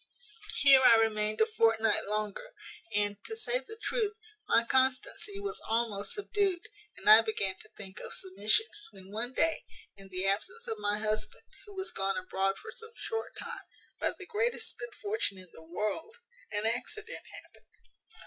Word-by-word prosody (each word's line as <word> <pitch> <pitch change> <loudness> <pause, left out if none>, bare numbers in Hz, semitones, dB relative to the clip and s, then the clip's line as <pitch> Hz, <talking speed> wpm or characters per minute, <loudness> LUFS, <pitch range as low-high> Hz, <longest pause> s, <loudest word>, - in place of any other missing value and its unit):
"Here 270 -2 +9
I 235 - +9
remained 215 -1 +2
a - - +7
fortnight 225 - +2
longer; 215 - -3 0.4
and, 205 -1 0
to 445 - -4
say 475 +3 0
the 440 -2 -11
truth, 435 -4 0 0.3
my 230 - +5
constancy 260 - +1
was 405 +1 -4
almost 220 -3 0
subdued, 400 -3 0 0.3
and - - -9
I 215 +1 +11
began 200 -4 -1
to 215 - -14
think 195 -1 -9
of - - -7
submission; 205 - +2 0.3
when, 190 -1 -13
one 235 +4 -1
day, 325 +4 +3 0.3
in 195 -1 -13
the 185 0 -2
absence 375 - -1
of 445 -2 -3
my 205 0 +1
husband, 215 0 -1 0.2
who 410 - -11
was 380 0 -2
gone 195 0 0
abroad 190 +1 0
for - - -9
some 450 0 -12
short 450 -1 -4
time, - - -6 0.4
by - - +2
the 385 - -8
greatest 450 +6 -1
good - - -6
fortune 410 - -1
in 185 -1 -12
the - - -12
world, 210 - -3 0.4
an 205 0 -1
accident 425 - -3 0.2
happened. - - -24
225 Hz, 170 wpm, -31 LUFS, -, 0.4 s, I